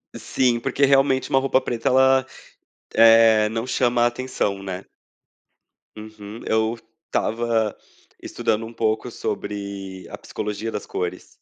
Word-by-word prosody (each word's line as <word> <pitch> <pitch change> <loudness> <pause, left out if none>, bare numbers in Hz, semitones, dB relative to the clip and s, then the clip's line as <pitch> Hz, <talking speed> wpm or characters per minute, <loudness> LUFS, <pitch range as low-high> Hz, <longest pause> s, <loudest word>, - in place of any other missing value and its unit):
Sim, 125 -2 0
porque 140 +4 +1
realmente 135 -1 +3
uma 135 - +3
roupa 135 0 +2
preta, 120 -2 -3
ela, 130 0 +4 0.7
eh, 115 -1 +6
não 115 +2 -3
chama 120 -1 +2
atenção, 120 -5 -2
né? 95 -1 -6 1.1
Uhum. 110 0 -10
Eu 110 +1 0 0.3
estava 115 -2 0 0.5
estudando 110 +1 -2
um 115 - -10
pouco 110 -1 -1
sobre 100 -2 -5
a - - -7
psicologia 105 +2 -5
das 105 - -5
cores. 90 -1 -4
115 Hz, 120 wpm, -22 LUFS, 105-125 Hz, 1.1 s, eh